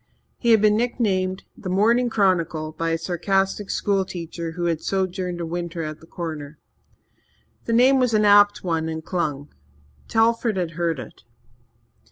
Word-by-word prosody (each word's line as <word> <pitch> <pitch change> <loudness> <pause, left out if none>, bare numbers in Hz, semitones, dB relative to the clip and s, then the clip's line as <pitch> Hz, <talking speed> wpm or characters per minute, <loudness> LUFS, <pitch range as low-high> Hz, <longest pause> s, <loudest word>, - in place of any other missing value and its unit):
He 235 - 0
had 220 -2 +5
been 210 -1 +5
nicknamed 195 -6 0
"The 185 - -7
Morning 230 +6 +3
Chronicle" 170 -7 +1
by 165 +1 -3
a 165 - +1
sarcastic 195 +3 -1
schoolteacher 175 -4 -2
who 175 +1 -3
had 165 -2 0
sojourned 185 -2 -2
a 170 - -3
winter 170 0 -4
at 155 0 -6
the 165 - -17
Corner. 155 -4 -6 1.1
The 230 - -1
name 260 +3 +5
was 250 -3 +2
an 210 0 +3
apt 205 0 +5
one 165 -3 -1
and 160 0 -5
clung. 150 -6 -3 0.5
Telford 230 -1 +2
had 175 -3 -1
heard 170 -1 -1
it. - - -10
185 Hz, 155 wpm, -23 LUFS, 165-210 Hz, 1.1 s, had